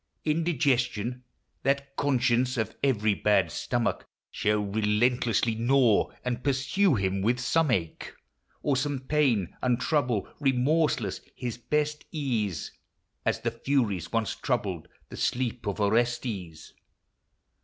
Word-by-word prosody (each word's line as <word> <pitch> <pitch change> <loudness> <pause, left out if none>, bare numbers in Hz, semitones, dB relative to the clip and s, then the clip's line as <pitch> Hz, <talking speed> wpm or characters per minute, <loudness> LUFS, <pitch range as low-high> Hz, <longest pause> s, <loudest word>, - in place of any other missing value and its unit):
Indigestion, 125 -7 0 0.4
that 140 0 -1
conscience 125 -2 +1
of 110 -3 -2
every 110 -6 +2
bad 100 -5 +2
stomach, 120 +6 -1 0.3
Shall 105 0 +1
relentlessly 110 +3 +1
gnaw 120 -1 +3 0.2
and 125 -1 -2
pursue 140 +6 +2
him 95 -1 0
with 120 +5 +1
some 160 +4 +2
ache 85 -9 -2 0.5
Or 145 - +2
some 140 0 -1
pain; 130 - +1
and 125 -1 +1
trouble, 125 - 0
remorseless, 135 - +1
his 120 -2 -5
best 150 +4 -1
ease, 115 - -2 0.6
As - - +1
the - - -1
Furies 115 - -1
once 115 -1 0
troubled 100 - -2 0.2
the - - -9
sleep 125 -2 -1
of 100 - -2
Orestes. 105 -5 -1
120 Hz, 115 wpm, -27 LUFS, 105-140 Hz, 0.6 s, gnaw